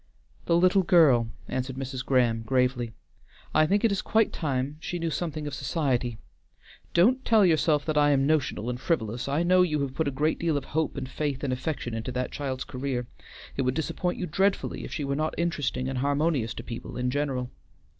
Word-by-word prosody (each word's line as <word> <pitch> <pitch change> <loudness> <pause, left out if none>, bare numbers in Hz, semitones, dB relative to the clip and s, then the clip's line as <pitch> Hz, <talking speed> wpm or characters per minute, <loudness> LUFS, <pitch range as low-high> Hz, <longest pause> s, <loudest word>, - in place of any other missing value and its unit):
"The 170 - +4
little 185 +2 +4
girl," 155 -10 +5 0.2
answered 130 0 -3
Mrs. 130 -1 -4
Graham, 120 -4 +2
gravely. 125 -1 0 0.6
"I 155 0 +4
think 200 +5 +2
it 225 - +3
is 200 - 0
quite 220 -1 +2
time 140 -2 -2
she 175 - -4
knew 165 -1 -2
something 155 -2 -3
of 145 - -4
society. 130 -4 -1 0.8
Don't 250 +10 +4
tell 220 -4 +5
yourself 155 -3 +3
that 155 -2 +1
I 145 0 +5
am 135 -1 +3
notional 140 -7 0
and 125 0 -3
frivolous; 120 -7 -1
I 145 +5 +1
know 180 +1 +5
you 155 -4 +2
have 135 -2 -2
put 150 +3 -1
a 135 -2 -3
great 155 +2 +1
deal 165 -3 +1
of 145 - -4
hope 155 -1 -1
and 130 -2 -3
faith 140 0 -3
and 135 -2 0
affection 125 -2 -3
into 115 +3 -3
that 125 0 -2
child's 135 -3 -3
career. 130 -1 -3 0.5
It - - 0
would 130 0 0
disappoint 175 +3 -2
you 180 - -2
dreadfully 195 +5 0
if - - -7
she 155 - -3
were 140 0 -1
not 155 +2 -1
interesting 145 -7 -1
and 135 -1 -2
harmonious 140 -4 0
to - - -6
people 115 - -7
in 125 0 0
general. 135 -3 -2
140 Hz, 205 wpm, -27 LUFS, 130-160 Hz, 0.8 s, girl